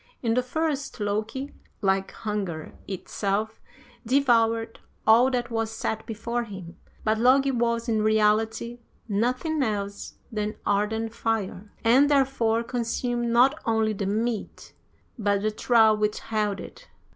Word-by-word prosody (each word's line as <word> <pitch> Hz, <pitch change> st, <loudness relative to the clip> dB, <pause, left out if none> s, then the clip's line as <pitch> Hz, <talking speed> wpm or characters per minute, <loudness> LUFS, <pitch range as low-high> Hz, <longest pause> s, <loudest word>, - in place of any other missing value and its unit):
In 230 Hz, -1 st, +2 dB
the 250 Hz, -, +3 dB
first, 285 Hz, 0 st, -2 dB
Loki, 215 Hz, +7 st, -2 dB, 0.3 s
like 190 Hz, 0 st, +1 dB
hunger 195 Hz, -7 st, -4 dB
itself, 200 Hz, +3 st, -3 dB, 0.4 s
devoured 230 Hz, -3 st, +2 dB, 0.3 s
all 235 Hz, +4 st, +6 dB
that 245 Hz, -2 st, -2 dB
was 225 Hz, -1 st, -1 dB
set 220 Hz, 0 st, -3 dB
before 235 Hz, +2 st, -2 dB
him, 190 Hz, -5 st, -9 dB, 0.3 s
but 215 Hz, 0 st, +1 dB
Logi 270 Hz, +3 st, +4 dB
was, 235 Hz, -1 st, 0 dB
in 220 Hz, -2 st, +1 dB
reality, 220 Hz, +2 st, +1 dB, 0.3 s
nothing 255 Hz, +9 st, 0 dB
else 205 Hz, -4 st, -3 dB, 0.2 s
than 215 Hz, -1 st, -2 dB
ardent 220 Hz, +2 st, 0 dB
fire, 215 Hz, -3 st, -2 dB
and 255 Hz, +5 st, +5 dB
therefore 260 Hz, -5 st, +2 dB
consumed 240 Hz, 0 st, -2 dB
not 260 Hz, +6 st, +4 dB
only 220 Hz, -1 st, +1 dB
the 200 Hz, -1 st, -3 dB
meat 220 Hz, +2 st, -3 dB, 0.5 s
but 200 Hz, -1 st, +1 dB
the 215 Hz, -, +1 dB
trough 220 Hz, -1 st, +4 dB
which 210 Hz, 0 st, 0 dB
held 210 Hz, -3 st, -1 dB
it. -, -, -11 dB
225 Hz, 130 wpm, -26 LUFS, 210-240 Hz, 0.5 s, all